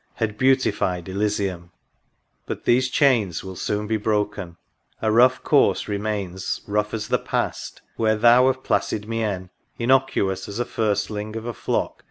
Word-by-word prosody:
Had 110 Hz, -3 st, -2 dB
beautified 125 Hz, -8 st, +1 dB
Elysium! 95 Hz, -3 st, -2 dB, 0.8 s
But -, -, -5 dB
these 130 Hz, +2 st, +3 dB
chains 120 Hz, -, +2 dB
Will 95 Hz, -1 st, -7 dB
soon 105 Hz, +3 st, -2 dB
be 110 Hz, +1 st, 0 dB
broken; 105 Hz, -4 st, -2 dB, 0.2 s
— -, -, -43 dB
a 110 Hz, -, +1 dB
rough 125 Hz, +3 st, +4 dB
course 145 Hz, -, +3 dB
remains, 100 Hz, -3 st, -3 dB
Rough 105 Hz, +1 st, -1 dB
as 105 Hz, -1 st, -4 dB
the -, -, +2 dB
past; -, -, -3 dB
where 110 Hz, -1 st, +2 dB
Thou, 120 Hz, +3 st, +6 dB
of 130 Hz, 0 st, 0 dB
placid 105 Hz, 0 st, -1 dB
mien, 105 Hz, -5 st, -3 dB, 0.3 s
Innocuous 115 Hz, -7 st, +1 dB
as 100 Hz, -, -6 dB
a 120 Hz, -, -1 dB
firstling 105 Hz, 0 st, -2 dB
of 115 Hz, 0 st, -5 dB
a 120 Hz, -, -3 dB
flock. -, -, -2 dB
105 Hz, 155 wpm, -23 LUFS, 100-120 Hz, 0.8 s, Thou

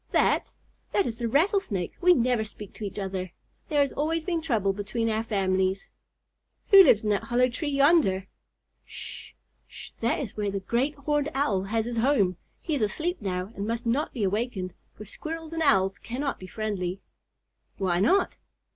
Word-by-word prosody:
"That? -, -, +2 dB, 0.4 s
That 400 Hz, -, +3 dB
is 230 Hz, 0 st, -4 dB
the 235 Hz, -, -1 dB
Rattlesnake. 285 Hz, -, +1 dB
We 360 Hz, 0 st, +6 dB
never 245 Hz, -2 st, +2 dB
speak 210 Hz, -2 st, -10 dB
to -, -, -9 dB
each 200 Hz, -, -5 dB
other. 190 Hz, -3 st, -4 dB, 0.4 s
There 295 Hz, -2 st, +3 dB
has 280 Hz, -, +1 dB
always 320 Hz, +2 st, -1 dB
been 335 Hz, -1 st, -1 dB
trouble 220 Hz, -11 st, +1 dB
between 220 Hz, +3 st, -2 dB
our 220 Hz, +1 st, 0 dB
families." 190 Hz, -3 st, 0 dB, 0.8 s
"Who 395 Hz, -1 st, +11 dB
lives 215 Hz, -, +5 dB
in 210 Hz, -, +1 dB
that 205 Hz, -, 0 dB
hollow 250 Hz, 0 st, +2 dB
tree 290 Hz, +5 st, -3 dB
yonder?" 275 Hz, -, +3 dB, 0.6 s
"Sh, -, -, -10 dB, 0.3 s
sh! -, -, -11 dB
That 230 Hz, -, +1 dB
is 245 Hz, -8 st, -5 dB
where 210 Hz, -1 st, -1 dB
the 195 Hz, 0 st, -2 dB
Great 240 Hz, +9 st, 0 dB
Horned 295 Hz, +1 st, 0 dB
Owl 205 Hz, -9 st, +1 dB
has 220 Hz, +2 st, -1 dB
his 240 Hz, 0 st, -4 dB
home. 225 Hz, -8 st, +2 dB, 0.3 s
He 320 Hz, -, -2 dB
is 280 Hz, -, 0 dB
asleep 335 Hz, -, -1 dB
now 185 Hz, +2 st, -3 dB
and 200 Hz, +1 st, -4 dB
must 230 Hz, +1 st, -2 dB
not 260 Hz, +7 st, 0 dB
be 235 Hz, -, -3 dB
awakened, 195 Hz, -2 st, -1 dB, 0.2 s
for 210 Hz, -, -10 dB
Squirrels 320 Hz, +8 st, -7 dB
and 325 Hz, -, -2 dB
Owls 195 Hz, -, +3 dB
cannot 270 Hz, +4 st, -3 dB
be 185 Hz, -, -9 dB
friendly." 195 Hz, -3 st, -3 dB, 0.8 s
"Why 180 Hz, -3 st, +1 dB
not?" 365 Hz, -, +2 dB
230 Hz, 180 wpm, -27 LUFS, 195-290 Hz, 0.8 s, Who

